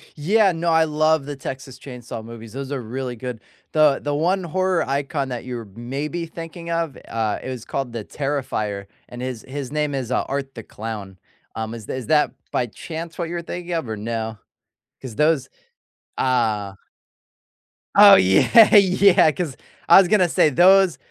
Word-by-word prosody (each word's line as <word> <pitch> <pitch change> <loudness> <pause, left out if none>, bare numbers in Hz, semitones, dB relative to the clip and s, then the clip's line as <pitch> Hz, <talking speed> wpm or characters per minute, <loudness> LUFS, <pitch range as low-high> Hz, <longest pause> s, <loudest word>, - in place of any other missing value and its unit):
Yeah, 195 +6 +3
no, 170 0 -2
I 160 0 +4
love 155 -1 +1
the 145 0 -6
Texas 135 -1 -8
Chainsaw 120 -4 -8
movies; 115 -1 -11
those 135 0 -6
are 135 -3 -3
really 125 +2 -5
good. 125 -1 -7 0.3
The 155 -3 +4
the 145 - -1
one 180 +6 +1
horror 185 0 0
icon 140 0 -2
that 125 0 -5
you're 120 -3 -6
maybe 145 +8 -4
thinking 165 +1 -9
of, 165 -4 -2
uh, 110 -2 -2
it - - -7
was 125 -3 -6
called 135 -4 -4
the 115 -3 -5
Terrifier, 110 -9 -3 0.2
and 120 0 -9
his 125 -3 -5
his 135 -1 -6
name 150 -1 -1
is, 130 -2 -4
uh, 125 - +1
Art 135 -1 -4
the 115 - -8
Clown. 105 -4 -7 0.4
Um, 110 0 -4
is 110 -3 -9
is 130 -4 -5
that 150 -1 +3 0.2
by 125 - 0
chance 165 +8 -8
what 170 -2 -3
you're 175 0 -3
thinking 175 +1 -6
of 160 -8 -2
or 110 - -4
no? 110 0 -4 0.6
'Cause 125 -5 -8
those 150 -3 +1 0.7
Ah. 110 -6 0 1.2
Oh 200 -1 +10
yeah, 95 - +6
yeah, 190 -3 +5
'cause, 155 -5 -4 0.3
I - - +10
was 195 - +4
gonna 185 -3 +3
say - - +3
those 185 +4 +5
140 Hz, 175 wpm, -22 LUFS, 120-165 Hz, 1.2 s, Oh